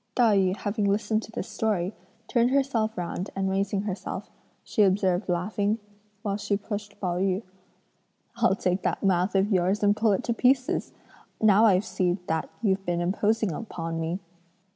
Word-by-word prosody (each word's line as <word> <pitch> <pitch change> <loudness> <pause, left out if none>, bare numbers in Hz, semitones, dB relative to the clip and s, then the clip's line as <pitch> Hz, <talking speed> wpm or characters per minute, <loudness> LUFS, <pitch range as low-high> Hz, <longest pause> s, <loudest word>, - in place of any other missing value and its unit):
'" - - -47
Tai 230 -4 +4
yü 190 0 +2
having 210 0 -1
listened 215 +2 +1
to 225 - -11
this - - -4
story, 205 -3 -1 0.3
turned 240 -1 +3
herself 255 -5 +1
round 175 +2 -3
and 190 0 0
raising 195 +1 0
herself, 200 -2 -5 0.3
she 220 - 0
observed 190 -1 +2
laughing, 205 +4 0 0.5
while 200 -2 -1
she 205 -1 -1
pushed 205 0 -6
Pao 180 -2 -1
yü: 190 +2 0 0.9
"I'll 235 -5 +3
take 185 -1 0
that - - -1
mouth 185 0 +2
of 195 +2 +2
yours 190 +2 +2
and 205 0 +4
pull 215 -1 +3
it - - -1
to 235 - 0
pieces! 255 +2 +2 0.5
Now 215 0 +5
I 190 -4 +5
see 185 -4 0
that 160 -1 -1
you've 195 -2 +1
been 175 -2 -1
imposing 205 +4 +1
upon 165 -3 -4
me." 165 +3 -2
200 Hz, 170 wpm, -26 LUFS, 185-215 Hz, 0.9 s, Now